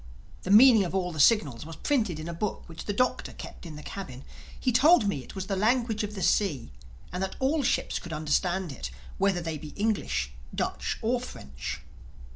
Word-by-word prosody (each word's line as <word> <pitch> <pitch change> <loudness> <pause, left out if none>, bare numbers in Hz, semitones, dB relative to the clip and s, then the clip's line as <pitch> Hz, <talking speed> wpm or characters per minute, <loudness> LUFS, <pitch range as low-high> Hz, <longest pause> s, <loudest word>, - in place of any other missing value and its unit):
The - - -6
meaning 225 +1 +8
of 185 +1 -3
all 180 -2 0
the 155 - -6
signals 145 - +4
was 165 +1 -8
printed 215 - 0
in 155 - -6
a 170 - -4
book 195 +5 -3
which 165 -1 -9
the - - -1
Doctor 250 +5 0
kept - - -9
in 155 - -8
the 150 - -9
cabin. 135 -10 -7 0.4
He 255 - +1
told 260 0 +6
me 145 -10 -1
it - - -12
was 190 -1 -3
the 195 - -1
language 225 +1 +1
of 210 0 -4
the 190 - -3
sea 165 - +1 0.4
and 180 - -3
that 190 - -2
all 285 +4 +2
ships 255 - 0
could 175 - -9
understand 165 +3 0
it 135 - -6 0.3
whether 195 -2 +2
they 165 -2 -4
be 150 0 -9
English, 205 - -1 0.2
Dutch, - - -2
or 240 +2 +1
French. 65 - -7
190 Hz, 205 wpm, -28 LUFS, 155-220 Hz, 0.4 s, meaning